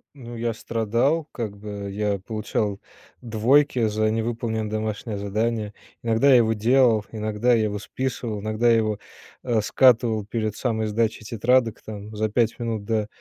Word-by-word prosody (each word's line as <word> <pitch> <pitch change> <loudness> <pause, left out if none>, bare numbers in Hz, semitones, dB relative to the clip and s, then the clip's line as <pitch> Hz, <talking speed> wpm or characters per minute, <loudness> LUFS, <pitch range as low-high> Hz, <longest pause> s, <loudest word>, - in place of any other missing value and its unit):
Ну, 120 -3 -9
я 115 0 -1
страдал, 115 +9 0
как 110 -4 -5
бы, 100 -1 -6
я 100 0 -1
получал 105 0 -3 0.4
двойки 120 +2 +3
за 110 0 +1
невыполненное 110 -1 -2
домашнее 110 0 -3
задание. 105 +1 -2 0.3
Иногда 115 +4 +3
я 135 - +8
его 110 -2 +3
делал, 115 -1 +3
иногда 110 +2 +1
я 115 -2 +3
его 105 -1 -2
списывал, 115 -2 -4
иногда 110 +3 +1
я 115 - +6
его, 110 -2 0 0.4
э, 120 -4 +1
скатывал 115 -2 +3
перед 110 -1 -3
самой 110 -3 -1
сдачей 110 +1 -1
тетрадок, 115 +1 +1
там 105 0 -8
за 110 +1 0
5 115 +1 +1
минут 115 -3 -3
до, 110 0 -1
110 Hz, 155 wpm, -24 LUFS, 105-120 Hz, 0.4 s, я